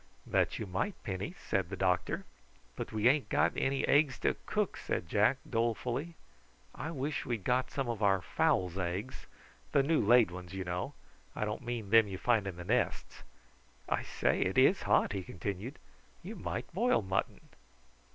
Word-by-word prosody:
"That - - +1
you 110 - -4
might, 95 - -2
Penny," 100 - -4
said 95 -3 0
the 95 - -4
doctor. 90 -1 0 0.5
"But - - -5
we 110 +1 +2
ain't 140 +2 +3
got - - +3
any 135 0 0
eggs 145 -2 +4
to - - +2
cook," - - 0
said 85 - -3
Jack 105 +8 +3
dolefully. 120 +7 -1 0.6
"I 155 - -5
wish 145 -2 -2
we'd 115 -5 -3
got 125 +3 +1
some 135 -3 -2
of 115 -3 -3
our 100 -2 +4
fowls' 90 +1 +1
eggs 95 +8 -4 0.5
the 140 - +5
new 155 +2 +2
laid 115 -2 +5
ones, 90 0 -8
you 95 - -3
know. 90 +10 -3 0.4
I 105 - -1
don't 105 +3 -3
mean 120 -5 -4
them 115 -1 +7
you 95 -2 -5
find 110 -1 +2
in 95 - -4
the 90 - -7
nests. 120 +5 -1 0.7
I - - 0
say, - - 0
it - - 0
is - - +5
hot," - - +4
he 100 - -2
continued. 100 - -5 0.5
"You - - -7
might 105 - -5
boil 225 - +2
mutton." 95 0 -2
110 Hz, 175 wpm, -32 LUFS, 95-130 Hz, 0.7 s, them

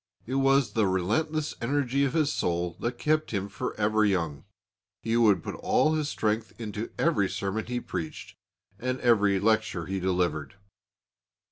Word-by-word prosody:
It 125 - -5
was 135 -1 +3
the 110 -4 +2
restless 150 - 0
energy 140 +2 +1
of 135 - -1
his 155 -3 +2
soul 85 0 -1
that 120 +1 -2
kept 155 +3 +1
him 100 -2 -2
for 100 - -4
ever 110 +1 +2
young. 85 -8 0 0.6
He 115 +1 0
would 105 -8 +4
put - - -4
all 155 - +2
his 155 -2 0
strength 110 -1 -2
into 110 0 -4
every 125 - +2
sermon 100 +3 -3
he 125 0 -2
preached, 80 -8 -6 0.4
and 130 +1 -2
every 105 -5 +4
lecture 100 -5 +1
he 95 0 -3
delivered. 90 -5 -1
110 Hz, 155 wpm, -27 LUFS, 95-130 Hz, 0.6 s, would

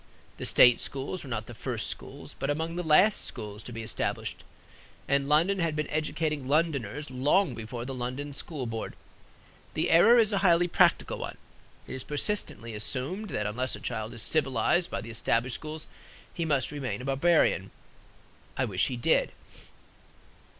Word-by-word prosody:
The - - -5
state 125 -2 +6
schools 140 +6 -3
were 140 - -9
not 110 -3 -3
the 120 - -10
first 110 - -3
schools, - - -6
but 135 - -2
among 160 +3 -1
the 180 - -1
last 180 +6 +4
schools 105 0 -5
to 120 - -9
be 115 -1 -6
established; 110 - -3 0.6
and 140 0 +1
London 170 +6 +3
had 165 -3 0
been 150 -1 -1
educating 155 -2 -1
Londoners 145 -3 0
long 140 +5 +2
before 115 +1 -6
the 135 - -5
London 130 +3 -4
School 140 -1 -4
Board. 115 -1 -5 0.8
The - - +1
error 210 +9 +7
is 220 -2 +4
a 200 - +2
highly 175 -2 +4
practical 175 -1 +3
one. - - -6 0.5
It - - -8
is 130 - -2
persistently 145 - -2
assumed 135 - -2
that 105 - -2
unless 125 +5 -1
a - - -9
child 110 0 -4
is 115 - +1
civilized 155 +4 +1
by - - -3
the 115 +2 -8
established 115 +2 0
schools, 155 +3 -6 0.5
he 170 - -2
must 140 -5 +1
remain 135 -3 -4
a - - -6
barbarian. 135 - +2 0.9
I 130 - +2
wish 95 -6 0
he 125 - -3
did. 120 - +2
140 Hz, 170 wpm, -28 LUFS, 120-165 Hz, 0.9 s, error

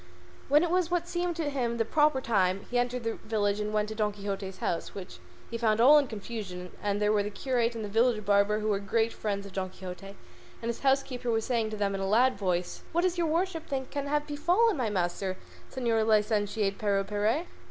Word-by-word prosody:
When 295 +3 +5
it 345 - 0
was 360 -2 +2
what 350 -1 0
seemed 350 0 -1
to 315 -3 -2
him 240 -4 -1
the 225 - +1
proper 295 +1 +3
time 195 -5 +1
he 245 - +2
entered 245 0 -1
the 225 0 -2
village 205 -2 0
and 210 0 -2
went 210 0 +1
to - - -4
Don 210 -1 0
Quixote's 200 -1 -5
house, 170 - -3
which 180 - -8 0.3
he 230 - -3
found 220 -2 +2
all 285 +6 +8
in 285 - -1
confusion, 200 -5 -6
and 205 0 0
there 210 0 +2
were 210 - +3
the 205 - -3
curate 240 +1 -1
and 220 -2 -4
the 205 +2 -5
village 230 -3 +3
barber, 205 +1 +3
who 215 - -1
were 200 -2 +1
great 225 +3 0
friends 200 -2 -3
of 195 - -10
Don 190 -1 -2
Quixote, 185 +1 -9 0.4
and 230 - -4
his 235 - -3
housekeeper 270 -2 0
was 225 -1 +1
saying 230 -3 0
to 215 - -5
them 200 -1 0
in 195 - -3
a 195 - -1
loud 250 +5 +4
voice, 180 -3 -2
"What 340 - +3
does 360 -1 +1
your 335 - +2
worship 330 0 -1
think 265 -2 -3
can 285 -1 -3
have 295 +1 0
befallen 355 +10 +2
my 250 -6 -1
master, 185 0 -1 0.3
Señor 235 -4 +1
Licentiate 210 -2 +1
Pero 200 -2 +1
Perez?" 210 - 0
220 Hz, 225 wpm, -29 LUFS, 200-265 Hz, 0.4 s, all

